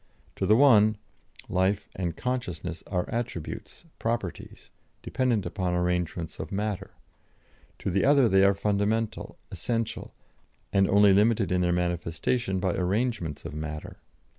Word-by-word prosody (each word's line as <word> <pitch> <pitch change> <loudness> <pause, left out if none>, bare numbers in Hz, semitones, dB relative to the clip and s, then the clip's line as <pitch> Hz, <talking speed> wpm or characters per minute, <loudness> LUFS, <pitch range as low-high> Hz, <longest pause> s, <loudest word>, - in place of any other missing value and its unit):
To - - 0
the 105 - +6
one, 110 -5 +6 0.5
life 95 +2 0
and 85 -3 -3
consciousness 90 -10 -3
are 90 -2 -1
attributes, 115 - -5
properties, 115 -6 -4 0.3
dependent 120 -5 0
upon 90 -3 -2
arrangements 90 -2 -2
of - - -6
matter; 100 -1 -3 0.8
to 95 - -3
the 100 +2 +1
other 140 -3 +5
they 95 -2 +4
are 100 0 +5
fundamental, 105 +2 -1
essential, 115 -2 -3 0.6
and 95 -1 +3
only 100 0 +6
limited 105 -1 +3
in 90 0 +2
their 90 -1 +2
manifestation 90 +4 -1
by 90 -1 0
arrangements 95 - -1
of - - -6
matter. 75 0 -6
100 Hz, 130 wpm, -27 LUFS, 90-110 Hz, 0.8 s, the